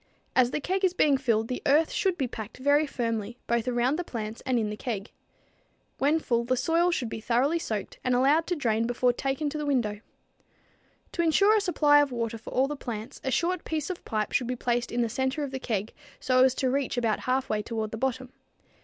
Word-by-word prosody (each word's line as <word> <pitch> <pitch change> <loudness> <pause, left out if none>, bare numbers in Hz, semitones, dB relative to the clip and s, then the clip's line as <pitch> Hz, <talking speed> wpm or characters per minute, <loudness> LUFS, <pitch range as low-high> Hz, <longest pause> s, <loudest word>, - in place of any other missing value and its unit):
As 255 -2 +5
the 270 - -2
keg 375 +6 -2
is 370 -1 +2
being 295 -5 +4
filled 230 -4 +1
the 250 - -4
earth 305 +3 +4
should 375 -3 0
be 270 -5 0
packed 220 -2 -8
very 285 +3 +3
firmly, 230 -3 -3
both 235 0 0
around 250 +4 +1
the - - -1
plants 225 -6 -6
and 255 -2 +2
in 215 -2 0
the - - -4
keg. 210 -2 -5 0.9
When 290 +4 +3
full 235 -6 0
the 255 +2 0
soil 335 +5 +2
should 265 -9 -1
be 220 - -5
thoroughly 255 +9 +1
soaked 215 - -4
and 255 -1 +2
allowed 285 +6 +3
to 355 - 0
drain 230 -6 0
before 245 +1 +2
being 240 - -14
taken 275 +2 -1
to 305 - -4
the 300 - -2
window. 225 -7 0 1.1
To 340 - -1
insure 395 +6 +4
a 430 - +3
supply 295 -6 +4
of 285 -2 0
water 230 -2 -3
for - - -10
all 265 +2 +2
the 295 - -4
plants, 225 -5 -7
a 265 - -1
short 345 +6 0
piece 315 +1 -2
of 360 - -8
pipe 215 -2 -2
should 250 - 0
be 250 - -2
placed 240 0 -1
in 240 - 0
the 235 - +1
center 265 +5 -1
of 280 - -4
the 265 - -4
keg 215 -4 -3 0.3
so 255 0 +3
as 260 -1 +3
to 260 -2 0
reach 270 -2 -1
about 230 -3 +1
half 260 +1 0
way 215 -1 0
toward 220 -1 -4
the 225 - -4
bottom. 260 +1 -2
255 Hz, 235 wpm, -27 LUFS, 230-290 Hz, 1.1 s, As